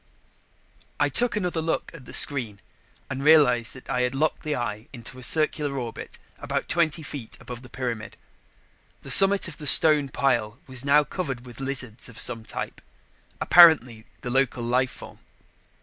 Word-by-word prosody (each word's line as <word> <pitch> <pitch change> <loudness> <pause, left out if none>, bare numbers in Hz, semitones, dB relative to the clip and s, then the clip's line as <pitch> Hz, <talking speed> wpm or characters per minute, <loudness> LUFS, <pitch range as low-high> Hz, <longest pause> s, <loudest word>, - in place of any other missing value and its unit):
I - - +1
took 240 -3 +2
another 180 -5 -3
look 160 0 -4
at 145 -6 -14
the - - -12
screen 120 -8 +3 0.5
and 135 +2 -6
realized 135 -7 +3
that 130 - -14
I 125 - -2
had 125 +1 -2
locked 155 +3 -2
the 150 -1 -4
eye 110 -2 -6
into 130 +1 -11
a - - -12
circular 150 0 0
orbit 120 -3 -8 0.2
about - - -5
twenty 160 -1 -1
feet 140 -6 -9
above 125 -1 -10
the 125 - -15
pyramid. 120 -5 -6 0.9
The - - -2
summit 195 0 +7
of 165 - -9
the 150 - -4
stone 150 -3 +5
pile 120 -5 -2
was 130 -1 -3
now 145 +1 +3
covered 135 -7 -6
with 120 0 -14
lizards 125 -4 -5
of 115 - -15
some 115 -2 +1
type, - - -7 0.6
apparently 130 -10 +4
the 125 - -6
local 130 -2 -1
life 125 +2 0
form. - - -13
130 Hz, 165 wpm, -23 LUFS, 120-155 Hz, 0.9 s, summit